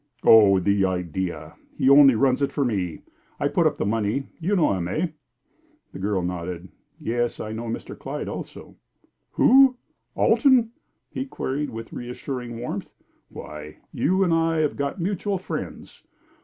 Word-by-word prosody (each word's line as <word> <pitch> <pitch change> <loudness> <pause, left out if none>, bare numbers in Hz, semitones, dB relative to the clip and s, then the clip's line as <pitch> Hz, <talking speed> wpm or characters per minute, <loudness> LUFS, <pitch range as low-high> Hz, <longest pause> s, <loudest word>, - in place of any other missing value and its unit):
"Oh, 100 -4 +7
the 100 +2 +1
idea! 90 -3 -3 0.2
He - - +1
only 140 -2 +8
runs 130 +3 +2
it 140 - +1
for 140 - 0
me. 95 -8 -2 0.4
I - - +1
put - - +2
up - - -2
the - - -1
money. 110 +5 -1
You 185 +5 0
know 170 - +3
him, 90 -3 -2
eh?" 160 - -1 0.8
The - - -8
girl 95 -1 -1
nodded. 90 0 -5 0.3
"Yes; 120 +1 -2
I 110 - -5
know 115 +2 -5
Mr. 115 - -5
Clyde - - -6
also." - - -8 0.6
"Who 265 0 +6 0.4
Alton?" 255 -5 +4 0.4
he 265 - -4
queried, 145 - -3
with 115 0 -8
reassuring 125 -1 -6
warmth. 120 - -6 0.3
"Why, 75 0 -9 0.2
you 190 +2 +2
and 175 -3 +2
I 165 0 +1
have 150 - 0
got 140 +6 -3
mutual 195 +2 -1
friends. 185 - -7
120 Hz, 155 wpm, -24 LUFS, -, 0.8 s, only